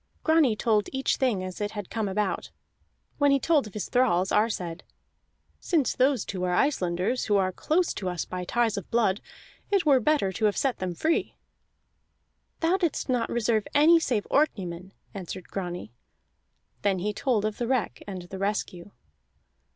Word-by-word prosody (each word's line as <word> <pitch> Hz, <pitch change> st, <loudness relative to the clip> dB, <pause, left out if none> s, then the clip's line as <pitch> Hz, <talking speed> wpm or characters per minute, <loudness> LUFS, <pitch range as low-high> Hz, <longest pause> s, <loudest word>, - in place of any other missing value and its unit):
Grani 315 Hz, -8 st, +4 dB
told 215 Hz, -1 st, +1 dB
each 265 Hz, 0 st, 0 dB
thing 235 Hz, -8 st, +1 dB
as 185 Hz, +2 st, -6 dB
it 205 Hz, 0 st, -2 dB
had 205 Hz, -3 st, -6 dB
come 220 Hz, -3 st, -1 dB
about. 200 Hz, 0 st, -1 dB, 0.7 s
When 285 Hz, -1 st, +4 dB
he 275 Hz, 0 st, +4 dB
told 295 Hz, -3 st, +2 dB
of 210 Hz, -, -14 dB
his 210 Hz, -, -3 dB
thralls, 195 Hz, -7 st, +2 dB
Ar 215 Hz, +2 st, +3 dB
said: 180 Hz, -4 st, -4 dB, 0.8 s
"Since 310 Hz, -8 st, +1 dB
those 260 Hz, -3 st, +2 dB
two 185 Hz, -2 st, -4 dB
are 180 Hz, -1 st, +1 dB
Icelanders, 185 Hz, -3 st, 0 dB
who 205 Hz, -1 st, +3 dB
are 190 Hz, -1 st, +1 dB
close 330 Hz, -, 0 dB
to 190 Hz, -3 st, -3 dB
us 175 Hz, -2 st, -3 dB
by 180 Hz, 0 st, -5 dB
ties 230 Hz, +2 st, 0 dB
of 195 Hz, -, -6 dB
blood, 220 Hz, -4 st, +1 dB, 0.5 s
it 395 Hz, -4 st, +2 dB
were 280 Hz, -3 st, +5 dB
better 250 Hz, -6 st, +2 dB
to 215 Hz, +4 st, -1 dB
have 205 Hz, -, +2 dB
set 270 Hz, -3 st, 0 dB
them 180 Hz, -2 st, -3 dB
free." 320 Hz, -, 0 dB, 1.3 s
"Thou 335 Hz, +3 st, +3 dB
didst 340 Hz, -6 st, -1 dB
not 245 Hz, -2 st, +1 dB
reserve 225 Hz, -2 st, 0 dB
any 320 Hz, +3 st, +7 dB
save 235 Hz, -9 st, -1 dB
Orkneymen," 190 Hz, -, 0 dB, 0.2 s
answered 185 Hz, -1 st, -7 dB
Grani. 175 Hz, -, -5 dB, 0.9 s
Then 195 Hz, -2 st, +1 dB
he 205 Hz, +4 st, -2 dB
told 220 Hz, -2 st, 0 dB
of 215 Hz, -1 st, -3 dB
the 240 Hz, -, -1 dB
wreck 255 Hz, -4 st, -1 dB
and 185 Hz, -3 st, -6 dB
the 190 Hz, +2 st, -8 dB
rescue. 195 Hz, -2 st, -3 dB
210 Hz, 175 wpm, -27 LUFS, 185-265 Hz, 1.3 s, any